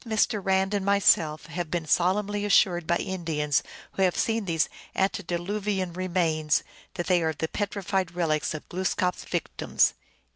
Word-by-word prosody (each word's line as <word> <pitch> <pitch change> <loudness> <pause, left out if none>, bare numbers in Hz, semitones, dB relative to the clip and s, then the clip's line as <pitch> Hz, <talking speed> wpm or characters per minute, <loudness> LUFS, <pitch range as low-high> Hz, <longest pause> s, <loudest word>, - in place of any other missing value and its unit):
1 235 - -11
Both 220 -1 -1
Mr. 210 -4 -3
Rand 190 +1 +1
and 200 -2 0
myself 170 -6 +3
have 165 0 -4
been 170 0 -2
solemnly 205 +5 +1
assured 180 -4 +3
by 170 - +3
Indians 160 -6 -1 0.3
who - - -4
had 185 -2 +3
seen 225 -2 0
these 165 -3 +1 0.3
antediluvian 190 +1 -1
remains 170 -4 +1 0.3
that 175 - -3
they 180 -2 +3
are 160 -1 0
the 160 +2 -3
petrified 195 -2 -2
relics 155 -3 0
of 155 - -8
Glooskap 185 0 0
s - - -11
victims. - - +1
180 Hz, 160 wpm, -26 LUFS, 165-195 Hz, 0.3 s, myself